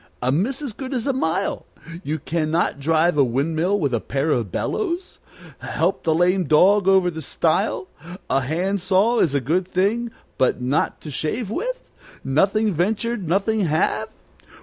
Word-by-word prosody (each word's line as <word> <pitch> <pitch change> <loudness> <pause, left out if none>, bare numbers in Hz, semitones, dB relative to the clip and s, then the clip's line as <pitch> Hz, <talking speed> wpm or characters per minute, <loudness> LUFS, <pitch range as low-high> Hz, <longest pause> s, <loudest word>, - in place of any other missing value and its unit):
"A 125 +1 0
miss 240 - 0
is 285 - -3
as - - -8
good 265 +4 -6
as 235 - -2
a 275 - +1
mile? 190 -5 -1 0.4
You 155 0 -2
can 155 +1 -2
not 160 -3 0
drive 160 +2 +2
a - - +7
windmill 160 +10 0
with 140 -7 0
a 120 - +1
pair 140 +3 -1
of 115 -9 0
bellows? 365 - -3 0.4
Help - - -1
the 160 -2 +1
lame 180 +2 +2
dog 185 +6 +4
over 190 -2 +4
the 160 -1 -6
stile? 160 +5 0 0.4
A 135 - +1
hand 180 +8 -1
saw 205 +6 +2
is 145 -4 +2
a - - +3
good 170 +8 0
thing, 205 +6 0 0.3
but 130 - +2
not 130 +4 -1
to 150 - -7
shave 190 - -3
with? - - -4 0.3
Nothing 200 +10 +2
venture, 215 +8 0
nothing 200 +3 0
have? 155 -1 0
175 Hz, 170 wpm, -22 LUFS, 155-210 Hz, 0.4 s, a